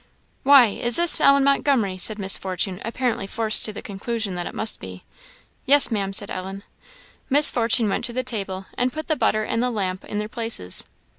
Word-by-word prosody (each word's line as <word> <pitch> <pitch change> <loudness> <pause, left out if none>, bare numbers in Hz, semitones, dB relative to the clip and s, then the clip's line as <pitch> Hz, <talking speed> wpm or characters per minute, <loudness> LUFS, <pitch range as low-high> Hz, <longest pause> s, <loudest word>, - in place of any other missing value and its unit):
"Why, 275 -2 +6
is 240 +3 +1
this 345 -1 +4
Ellen 275 0 +4
Montgomery?" 275 -8 +1
said 210 +3 +1
Miss 195 -2 +3
Fortune, 185 0 -3
apparently 230 -3 -3
forced 220 0 +3
to 215 - -3
the 210 - -10
conclusion 210 0 -5
that 175 -1 -5
it - - -9
must 220 - -1
be. 95 -1 -11 0.6
"Yes, 280 -1 +5
Maam," 200 -3 -2
said 200 +1 -2
Ellen. 190 +2 -7 0.7
Miss 290 +2 +5
Fortune 230 -2 +1
went 195 - -2
to 235 - -6
the 255 +1 -3
table, 195 -6 -5
and 250 +1 -1
put 310 +2 -7
the 310 - 0
butter 215 -4 0
and 230 +2 -2
the 250 - 0
lamp 190 -5 -4
in 210 - -6
their 210 0 -3
places. 225 - -2
220 Hz, 200 wpm, -22 LUFS, 195-250 Hz, 0.7 s, Why